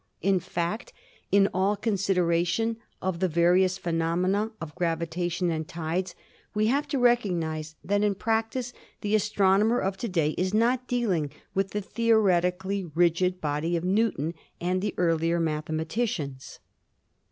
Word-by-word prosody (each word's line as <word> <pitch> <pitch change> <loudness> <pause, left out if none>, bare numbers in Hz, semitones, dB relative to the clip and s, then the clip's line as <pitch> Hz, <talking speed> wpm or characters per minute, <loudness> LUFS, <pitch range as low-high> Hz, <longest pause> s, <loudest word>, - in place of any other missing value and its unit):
In 195 -1 +3
fact, 185 - -3 0.4
in 200 0 +5
all 195 +3 +2
consideration 195 0 +1 0.3
of 185 -2 -1
the 185 - +2
various 180 +3 +3
phenomena 180 +5 0
of 155 -2 -7
gravitation 170 +1 -1
and 160 -1 -3
tides 175 +2 -3 0.4
we 210 0 +2
have 290 +2 0
to 280 0 -1
recognise 170 -11 +1
that 205 +1 +1
in 205 -1 +2
practice 225 +4 -1 0.3
the 205 0 -1
astronomer 210 +2 +3
of 195 0 -1
to 230 +4 -3
day 165 -5 +1
is 185 +3 0
not 245 +3 +2
dealing 195 -12 0 0.2
with 195 0 0
the 210 - -3
theoretically 195 -3 +1
rigid 175 +2 +1
body 155 +2 -1
of 165 - -4
Newton 185 -5 +1 0.3
and 180 +1 0
the 205 +1 -2
earlier 165 -1 +2
mathematicians. 155 - -2
185 Hz, 135 wpm, -27 LUFS, 170-210 Hz, 0.4 s, in